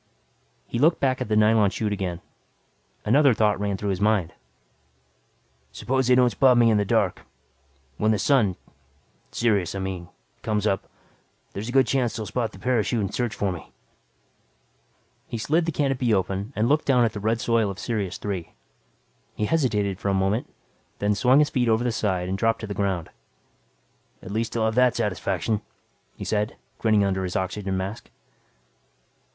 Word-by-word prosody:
He 120 - -4
looked 160 +5 +4
back 130 -2 0
at - - -2
the 105 - 0
nylon 105 -1 +4
chute 105 +1 -2
again. 90 -4 -4 0.8
Another 135 +2 +4
thought 105 -2 +2
ran 100 -1 -1
through 100 0 -2
his 95 0 -3
mind. 105 -5 +1 1.4
Suppose 130 0 -1
they 125 - +5
don't 125 -1 +4
spot 125 +3 +4
me 115 -1 +5
in 110 - +3
the 100 - +1
dark. - - +1 0.8
When 110 - +1
the 110 - +3
sun 105 -4 +2 0.8
Sirius, 100 -6 0
I - - -3
mean 95 -2 -5 0.3
comes 105 -2 -1
up, 95 -3 -1 0.6
there's 105 +4 -5
a - - -3
good 135 +1 +4
chance 125 -5 0
they'll 110 -2 -4
spot 110 +2 -2
the - - -13
parachute 120 -3 0
and 100 -2 -2
search 120 -3 -2
for 95 -3 -1
him. 80 - -12 1.6
He 115 - -4
slid 160 +9 +1
the - - +1
canopy 135 -6 +1
open 95 +3 -2
and 110 +2 +1
looked 150 +4 +2
down 125 -3 +4
at 110 - -1
the 105 - -5
red 110 +3 0
soil 115 -2 +1
of 95 - -6
Sirius 105 -4 -3
Three. 95 -5 -5 0.8
He 105 - -1
hesitated 105 - 0
for 100 - -2
a 100 - +1
moment, 95 +5 0 0.5
then 105 +1 +1
swung 125 +6 +4
his 150 0 +3
feet 125 -3 +1
over 110 +1 +2
the 125 - 0
side 95 -5 -1
and 95 - -2
dropped 115 +1 +1
to - - -4
the 100 - -5
ground. 95 -5 -2 1.1
"At 95 - -8
least 115 +2 -2
I'll 110 - +1
have 110 - +1
that 125 +1 +3
satisfaction," 105 0 -1 0.5
he - - -7
said, 105 0 -1 0.2
grinning 110 -2 +3
under 95 -1 0
his 90 -1 -4
oxygen 95 +1 -2
mask. 95 +4 -5
110 Hz, 180 wpm, -24 LUFS, 100-120 Hz, 1.6 s, they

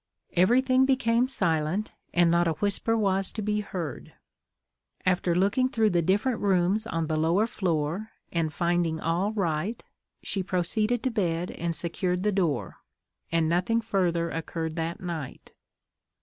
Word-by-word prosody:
Everything 255 +8 +4
became 250 -2 +2
silent, 170 - 0 0.2
and 175 -1 +4
not 170 0 +3
a 165 - +2
whisper 205 +5 0
was 195 -2 +1
to 215 - -5
be 210 0 0
heard. 170 -9 -6 0.9
After 180 -1 +2
looking 205 +8 +2
through 220 -3 +2
the 175 -1 +2
different 205 +8 +1
rooms 195 +2 +1
on 165 -6 -1
the 155 0 -1
lower 170 +7 +3
floor, 180 -1 -2 0.2
and 165 -2 0
finding 170 -1 0
all 175 +6 0
right, 195 +1 -2 0.4
she 195 - -1
proceeded 210 +6 0
to 260 - 0
bed 180 -5 -1
and 170 0 -3
secured 180 +3 -1
the 210 - +2
door, 170 -10 -1 0.5
and 165 -1 +2
nothing 180 +7 +1
further 175 -6 0
occurred 160 0 -4
that 165 0 -3
night. 165 -6 -6
180 Hz, 145 wpm, -27 LUFS, 165-215 Hz, 0.9 s, Everything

